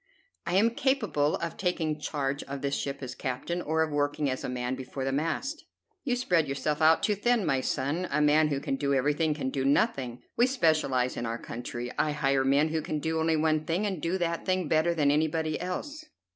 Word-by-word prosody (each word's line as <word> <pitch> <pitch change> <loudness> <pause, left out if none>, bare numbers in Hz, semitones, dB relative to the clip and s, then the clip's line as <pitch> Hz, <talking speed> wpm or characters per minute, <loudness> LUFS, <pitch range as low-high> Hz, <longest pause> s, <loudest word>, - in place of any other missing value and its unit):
"I 175 - 0
am 220 +4 +4
capable 235 - +1
of 170 0 -4
taking 160 -5 -1
charge 140 -2 -2
of 140 0 -6
this 140 0 -1
ship 140 0 -3
as 125 -1 -5
captain, 140 +8 -3
or 160 0 +1
of 160 - -3
working 145 -1 0
as 130 - -4
a - - -3
man 125 0 -2
before 130 +1 -5
the 135 - 0
mast." 165 - -2 0.4
"You 250 -4 0
spread 180 - +1
yourself 145 +3 -2
out 160 +1 +5
too 210 - +3
thin, 225 +1 +1
my 135 -3 +1
son. 155 +8 -1
A 150 - +1
man 150 +1 +4
who 140 -2 -1
can 135 -1 -2
do 140 0 +1
everything 150 +3 +1
can 130 -3 -3
do 135 -1 -1
nothing. 130 -3 +1
We 240 - +4
specialize 155 - +1
in 120 - -2
our 115 +1 -2
country. 120 +1 -6
I 150 - +2
hire 135 -2 +1
men 140 +4 +3
who 160 0 -1
can 155 0 -3
do 160 +2 -1
only 160 0 +2
one 155 0 +2
thing, 170 +6 -1
and 190 -6 -2
do 170 +3 0
that 170 -2 -1
thing 185 -3 0
better 160 +3 +2
than 145 -3 +3
anybody 155 +1 0
else." 290 - -4
155 Hz, 215 wpm, -28 LUFS, 140-170 Hz, 0.4 s, out